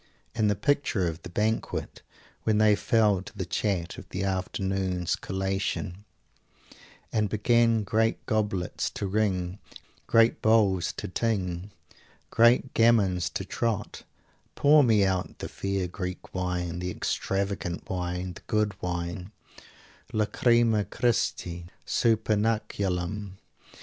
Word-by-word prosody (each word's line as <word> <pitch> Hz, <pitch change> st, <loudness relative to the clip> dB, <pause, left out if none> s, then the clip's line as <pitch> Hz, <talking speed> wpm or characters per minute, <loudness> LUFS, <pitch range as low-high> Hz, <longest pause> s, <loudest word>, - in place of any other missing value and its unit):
And 110 Hz, -3 st, +2 dB
the 105 Hz, -, +2 dB
picture 120 Hz, -7 st, +1 dB
of 80 Hz, +1 st, -5 dB
the -, -, -9 dB
banquet 110 Hz, +5 st, -2 dB, 0.4 s
"when 110 Hz, -1 st, +1 dB
they 105 Hz, -1 st, +5 dB
fell 105 Hz, -2 st, +2 dB
to 100 Hz, -, -12 dB
the 95 Hz, -, -2 dB
chat 90 Hz, -2 st, -2 dB
of -, -, -13 dB
the 95 Hz, -, -3 dB
afternoon's 95 Hz, -1 st, -1 dB
collation 95 Hz, 0 st, -3 dB, 1.1 s
and 105 Hz, -2 st, +1 dB
began 115 Hz, +1 st, +3 dB
great 110 Hz, +3 st, 0 dB
goblets 105 Hz, -6 st, -1 dB
to -, -, -3 dB
ring, 95 Hz, -2 st, -1 dB, 0.5 s
great 115 Hz, 0 st, +4 dB
bowls 105 Hz, -5 st, +3 dB
to -, -, -5 dB
ting, 95 Hz, -3 st, -2 dB, 0.6 s
great 120 Hz, +3 st, +4 dB
gammons 100 Hz, -6 st, +3 dB
to 95 Hz, -, -4 dB
trot; 115 Hz, +1 st, -2 dB, 0.5 s
pour 150 Hz, +1 st, +6 dB
me 110 Hz, -5 st, +4 dB
out 95 Hz, -1 st, -1 dB
the -, -, -5 dB
fair 100 Hz, -2 st, -2 dB
Greek 90 Hz, 0 st, -6 dB
wine, 90 Hz, -2 st, -2 dB
the 90 Hz, 0 st, -3 dB
extravagant 95 Hz, -1 st, -2 dB
wine, 90 Hz, 0 st, -3 dB
the -, -, -12 dB
good 105 Hz, -1 st, +1 dB
wine, 90 Hz, +1 st, -4 dB, 0.8 s
Lacrima 115 Hz, 0 st, +3 dB
Christi, 90 Hz, -7 st, -1 dB, 0.2 s
supernaculum!" 105 Hz, -3 st, 0 dB
100 Hz, 115 wpm, -27 LUFS, 90-110 Hz, 1.1 s, pour